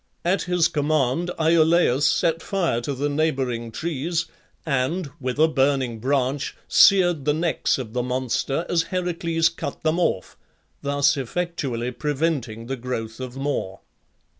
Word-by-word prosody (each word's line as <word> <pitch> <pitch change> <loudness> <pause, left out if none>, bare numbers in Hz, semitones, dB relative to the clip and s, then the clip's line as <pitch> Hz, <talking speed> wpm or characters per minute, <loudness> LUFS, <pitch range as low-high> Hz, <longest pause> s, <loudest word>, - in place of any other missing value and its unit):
At 180 +3 +2
his 180 -2 +3
command 150 +1 0
Iolaus 160 -3 +4
set 165 -1 +1
fire 170 -12 0
to 140 +3 -3
the 140 +3 -1
neighbouring 135 -6 -1
trees, 165 +4 -2 0.4
and, 145 +3 -1
with 130 0 -3
a 160 +1 +5
burning 135 -5 +1
branch, 135 +2 -1
seared 175 -7 +5
the 150 0 +2
necks 165 +1 0
of 120 -5 -6
the 125 - 0
monster 130 +5 -1
as 170 -1 +2
Heracles 170 -3 0
cut - - -7
them 160 +2 +1
off, 95 - -1 0.4
thus 145 +1 +2
effectually 135 -4 -3
preventing 130 -4 -2
the 135 +2 -4
growth 115 -2 -5
of 130 0 -6
more. 135 -9 -3
145 Hz, 140 wpm, -23 LUFS, 125-165 Hz, 0.4 s, a